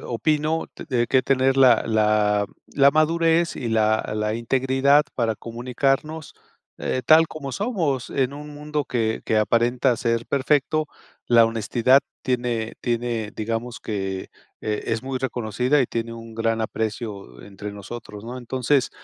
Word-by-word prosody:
opino 155 +6 0
de - - -8
de 120 - +2
que 130 -1 +3
tener 135 0 +2
la 125 -4 +6
la 105 -2 +2 0.2
la 140 0 +4
madurez 165 +2 +2
y 120 - -3
la 110 -1 +1
la 105 0 -1
integridad 135 +4 +3
para 115 -3 0
comunicarnos, 135 +7 -2 0.4
eh, 130 - -2
tal 160 +1 +6
como 145 -4 -6
somos, 170 - -1
en 135 0 0
un 150 +1 -9
mundo 150 0 -3
que 115 -3 -1
que 110 - +2
aparenta 120 +3 +2
ser 115 0 -1
perfecto. 145 +2 +1 0.4
La 115 -1 +6
honestidad 115 +4 +3 0.2
tiene 120 -3 -1
tiene, 120 -3 -2
digamos 115 +2 -3
que, 95 -3 -4 0.3
eh, 105 -1 -2
es 115 -1 -1
muy 135 0 -3
reconocida 125 +2 0
y 130 - +2
tiene 115 0 -3
un 115 -1 -10
gran 115 0 0
aprecio 105 - -4
entre 100 +1 -8
nosotros, 105 +1 -9
¿no? 120 +2 -6
Entonces, 130 +2 0
120 Hz, 145 wpm, -23 LUFS, 110-140 Hz, 0.4 s, la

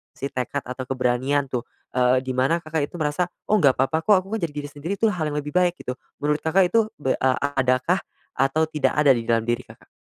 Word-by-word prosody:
si 140 - -4
tekad 130 +2 -2
atau 130 +1 -6
keberanian 130 +2 0
tuh, 125 -2 -3 0.3
eee, 125 0 +4
di 130 0 -4
mana 165 +7 +2
Kakak 155 -2 -1
itu - - -14
merasa, 150 +4 +1 0.2
"Oh 215 - +5
nggak 140 -9 +5
papa 135 +5 +1
kok, 210 - +6
aku 190 - -14
kan - - -6
jadi 145 - -8
diri 145 - -7
sendiri 150 +6 -5
tuh 225 +1 +2
hal 160 -5 -2
yang - - -2
lebih 150 - -6
baik," 180 -1 +3
gitu. 125 0 -5 0.2
Menurut 150 +1 +1
Kakak 180 +3 +3
itu 225 +3 +3 0.2
be 130 - +1
a 130 -1 +2 0.2
adakah 130 +6 +2 0.4
atau 135 +4 +2
tidak 150 -2 +1
ada 150 -2 +4
di 115 -2 -3
dalam 115 -1 +3
diri, 120 +1 -1
Kakak? - - -17
145 Hz, 235 wpm, -23 LUFS, 130-160 Hz, 0.4 s, kok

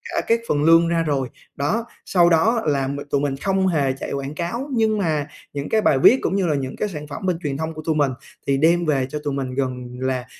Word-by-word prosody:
cả - - +2
các 230 0 +3
phần 145 -1 +1
lương 165 +1 +6
ra 165 -1 +1
rồi. 135 -4 -1 0.3
Đó, 175 +12 -1 0.2
sau 175 -2 +4
đó 220 +8 +3
là 140 -3 +1
m 140 +1 -3
tụi 140 - +1
mình 140 -2 -1
không 190 +4 +1
hề 140 -6 +1
chạy 135 - -6
quảng 140 +2 -4
cáo 235 +11 -3
nhưng 220 -2 +2
mà 155 -6 0 0.3
những 140 0 -4
cái 220 - +2
bài 135 -8 +3
viết 255 - +7
cũng 190 - 0
như 190 -3 +1
là 150 - +1
những 135 -1 -3
cái 210 - -2
sản 150 -5 -7
phẩm 150 +7 -7
bên 180 -3 0
truyền 145 -5 -3
thông 160 +1 -3
của 155 - -7
tụi 160 - +1
mình 145 -3 +2 0.4
thì 140 - +2
đem 170 +4 +3
về 135 -4 +1
cho 150 - -4
tụi 145 - -2
mình 130 -2 -3
gần 130 -2 -1 0.2
là 130 -1 -1
150 Hz, 260 wpm, -22 LUFS, 140-175 Hz, 0.4 s, viết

